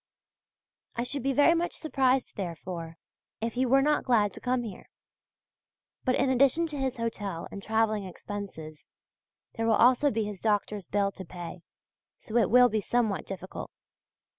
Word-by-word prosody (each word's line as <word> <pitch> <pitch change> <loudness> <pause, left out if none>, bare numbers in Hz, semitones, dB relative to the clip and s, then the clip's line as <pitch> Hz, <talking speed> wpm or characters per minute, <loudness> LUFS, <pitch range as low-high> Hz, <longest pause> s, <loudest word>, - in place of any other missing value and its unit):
I 235 - -1
should 280 +3 -1
be 275 +3 +1
very 290 +5 +5
much 340 +1 -1
surprised, 265 -4 +1
therefore, 170 -2 -6 0.4
if 230 0 -2
he 255 +1 +1
were 270 +2 +5
not 300 +1 +2
glad 215 -5 +2
to - - -9
come 250 -1 0
here. 210 -5 -9 1.2
But 255 -1 +3
in 270 - +2
addition 275 +5 +3
to 295 - -5
his 265 -1 -1
hotel 205 -7 -3
and 200 - -7
travelling 215 -1 +1
expenses, 180 -5 -8 0.7
there 225 0 -1
will 225 - +4
also 255 +5 +5
be 225 -3 -1
his 205 -3 -6
doctor's 210 -3 0
bill 200 -1 +1
to 195 - -9
pay; 175 0 -8 0.6
so 220 - -9
it 225 -5 +3
will 250 +2 +7
be 220 -2 -1
somewhat 220 -2 0
difficult. 190 -1 -7
225 Hz, 165 wpm, -28 LUFS, 195-255 Hz, 1.2 s, will